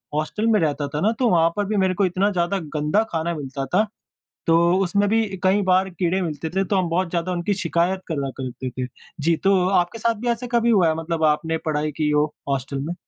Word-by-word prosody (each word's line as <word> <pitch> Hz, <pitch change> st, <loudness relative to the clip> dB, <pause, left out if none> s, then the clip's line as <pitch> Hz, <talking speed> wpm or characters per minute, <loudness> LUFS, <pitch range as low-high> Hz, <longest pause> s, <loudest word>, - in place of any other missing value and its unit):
Hostel 155 Hz, +9 st, -1 dB
में 220 Hz, -2 st, +4 dB
रहता 145 Hz, -3 st, 0 dB
था 150 Hz, +2 st, -4 dB
ना 215 Hz, -, +3 dB
तो 250 Hz, -3 st, +3 dB
वहाँ 165 Hz, -3 st, +4 dB
पर 205 Hz, -, +1 dB
भी 210 Hz, +2 st, -2 dB
मेरे 190 Hz, -1 st, +2 dB
को 200 Hz, +1 st, +1 dB
इतना 185 Hz, +3 st, +1 dB
ज़्यादा 180 Hz, +1 st, 0 dB, 0.2 s
गंदा 150 Hz, +8 st, +2 dB
खाना 165 Hz, +1 st, -1 dB
मिलता 135 Hz, -2 st, -5 dB
था। 215 Hz, +3 st, +3 dB, 0.6 s
तो 165 Hz, -, +5 dB, 0.3 s
उसमें 200 Hz, +3 st, +1 dB
भी 225 Hz, +1 st, +3 dB, 0.2 s
कई 190 Hz, +2 st, +3 dB
बार 185 Hz, 0 st, +3 dB
कीड़े 180 Hz, +1 st, -1 dB
मिलते 160 Hz, -2 st, -3 dB
थे 190 Hz, +4 st, 0 dB
तो 200 Hz, -, -1 dB
हम 185 Hz, -3 st, +1 dB
बहुत 175 Hz, +2 st, 0 dB
ज़्यादा 170 Hz, +1 st, -2 dB
उनकी 175 Hz, +3 st, -1 dB
शिकायत 185 Hz, 0 st, 0 dB
करा 140 Hz, -5 st, -2 dB
करते 130 Hz, 0 st, -5 dB
थे। 125 Hz, 0 st, -4 dB, 0.3 s
जी, 165 Hz, +3 st, +3 dB
तो 190 Hz, -1 st, +2 dB
आपके 180 Hz, +3 st, +1 dB
साथ 230 Hz, +1 st, +1 dB
भी 245 Hz, -, -3 dB
ऐसे 235 Hz, +1 st, -1 dB
कभी 235 Hz, -1 st, +2 dB
हुआ 195 Hz, -7 st, +4 dB
है 160 Hz, -, +1 dB
मतलब 165 Hz, 0 st, -3 dB
आपने 160 Hz, +1 st, +2 dB
पढ़ाई 155 Hz, -1 st, -1 dB
की 150 Hz, -1 st, +1 dB
हो 150 Hz, 0 st, +3 dB, 0.2 s
हॉस्टल 135 Hz, 0 st, -2 dB
में? 170 Hz, -, -2 dB
175 Hz, 230 wpm, -22 LUFS, 155-195 Hz, 0.6 s, तो